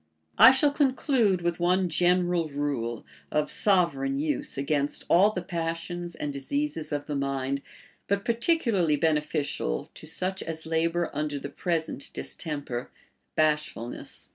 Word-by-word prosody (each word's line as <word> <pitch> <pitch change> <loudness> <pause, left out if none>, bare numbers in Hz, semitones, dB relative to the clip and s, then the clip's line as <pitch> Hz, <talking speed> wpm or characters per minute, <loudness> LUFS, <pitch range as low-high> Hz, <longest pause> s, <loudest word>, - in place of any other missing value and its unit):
I 225 +3 +11
shall 275 +3 +4
conclude 260 - +2
Λvith 175 0 -1
one 180 +2 +2
general 175 0 +2
rule, 140 -6 -2 0.3
of 150 0 0
sovereign 165 -9 +2
use 145 -2 -1
against 140 +1 0
all 190 +5 +6
the 185 -4 -4
passions 170 0 -4
and 145 -1 -4
diseases 160 - -2
of 145 -1 -2
the 150 - -3
mind, 140 0 -1 0.5
but 200 0 0
particularly 230 - +2
beneficial 150 - -1
to 155 - -11
such 185 +4 -2
as 160 -1 -5
labor 165 +1 0
under 150 0 -2
the 140 - -6
present 160 -4 -2
distemper, 120 - -4 0.5
bashfulness. 150 -6 -1
160 Hz, 130 wpm, -27 LUFS, 145-180 Hz, 0.5 s, I